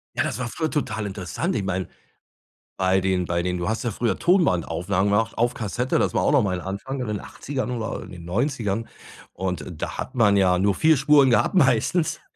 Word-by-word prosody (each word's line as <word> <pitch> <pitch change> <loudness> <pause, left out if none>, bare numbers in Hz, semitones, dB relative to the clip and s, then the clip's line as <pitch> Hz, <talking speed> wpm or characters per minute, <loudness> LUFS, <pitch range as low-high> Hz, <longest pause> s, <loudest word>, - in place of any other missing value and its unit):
Ja, - - +1
das - - -3
war 125 - -2
früher 160 +6 -2
total 110 -9 -2
interessant. 95 -6 -3
Ich 105 - -1
meine, 95 -1 -2 0.9
bei 95 0 +2
den 95 -1 0
bei 85 0 0
den 90 0 -2
du 85 +3 -2
hast 115 +2 -2
ja 120 - 0
früher 115 +3 -1
Tonbandaufnahmen 95 - +1
gemacht 115 +2 +1
auf 120 +1 +2
Kassette, 120 +4 -1
das - - 0
war - - +2
auch - - +2
noch 145 -3 +5
mal 95 -3 -1
'n - - -5
Anfang 100 +8 -5
in 125 - -2
den 105 -1 -3
80ern 135 -2 -5
oder 115 -3 -4
in - - -10
den 85 -2 -10
90ern. 115 - -1 0.4
Und 90 -3 -3 0.2
da - - -4
hat - - -5
man 105 -5 +4
ja 90 -2 +3
nur 100 +1 +2
4 160 +8 +4
Spuren 140 -1 +5
gehabt 120 - +2
meistens, 160 +2 +2
105 Hz, 215 wpm, -24 LUFS, 95-130 Hz, 0.9 s, noch